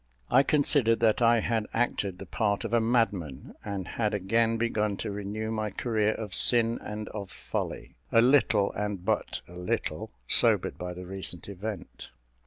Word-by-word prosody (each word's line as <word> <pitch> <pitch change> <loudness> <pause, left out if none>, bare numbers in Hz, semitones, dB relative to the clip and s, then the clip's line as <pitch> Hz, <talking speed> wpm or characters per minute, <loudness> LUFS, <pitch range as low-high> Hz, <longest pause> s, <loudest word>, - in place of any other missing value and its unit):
I 130 - +6
considered 140 -6 +3
that 110 0 +3
I 115 -1 +4
had 110 -2 -1
acted 105 -5 -1
the 95 - -9
part 100 +3 -1
of 115 0 -5
a 120 - +5
madman, 110 - -1
and 100 -3 -5
had 105 -2 -1
again 115 +4 +1
begun 105 -3 -1
to 110 - -4
renew 105 +2 -4
my 110 -1 -2
career 110 0 0
of 105 -4 -6
sin 115 -1 +4
and 105 0 -6
of 100 -3 -7
folly, - - -5 0.2
a 115 - +5
little, 115 -5 +4
and 100 -3 -4
but 110 0 -1
a 90 - -14
little, 90 0 -3 0.2
sobered - - +4
by 90 0 -5
the 90 +1 -8
recent 95 -2 -3
event. 100 +2 -7
110 Hz, 170 wpm, -28 LUFS, 100-115 Hz, 0.2 s, I